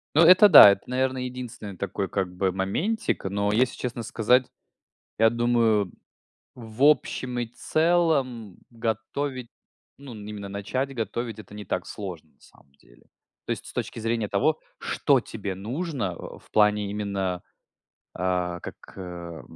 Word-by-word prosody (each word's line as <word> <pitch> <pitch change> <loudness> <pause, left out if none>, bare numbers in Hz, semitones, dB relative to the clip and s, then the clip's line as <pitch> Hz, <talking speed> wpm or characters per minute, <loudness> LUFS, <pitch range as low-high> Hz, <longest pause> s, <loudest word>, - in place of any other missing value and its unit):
Ну, 160 - +6
это 185 +5 +8
да, 105 - +11
это, 100 - -1
наверное, 130 0 0
единственный 125 -6 -7
такой, 100 0 -3
как 95 -2 -2
бы, 95 +1 +1
моментик, 125 - -1
но, 100 +1 0
если 125 +3 +1
честно 120 -1 -4
сказать, 125 +2 +2 0.7
я 110 +1 +5
думаю, 115 -4 +2 0.6
в 115 +1 -5
общем 130 -4 +2
и 120 - 0
целом 155 - +1
готовить, 120 +3 -3 0.5
ну, 135 -4 -10
именно 105 -1 -7
начать 130 +8 -3
готовить- 115 0 -3
это 105 -1 -12
не 105 0 -7
так 90 0 -2
сложно 90 -7 -8
на - - -38
самом 70 - -22
деле. - - -23 0.4
То - - -3
есть - - -4
с - - -10
точки - - -4
зрения 115 -1 -1
того, 125 +11 +1 0.2
что 140 -3 +2
тебе 100 -4 -5
нужно 120 - -3
в - - -11
плане 105 -1 +3
именно, 100 -3 -3 0.8
э, 90 -1 -1
как, - - -7 0.2
э, 85 -3 -8
110 Hz, 145 wpm, -25 LUFS, 100-125 Hz, 0.8 s, да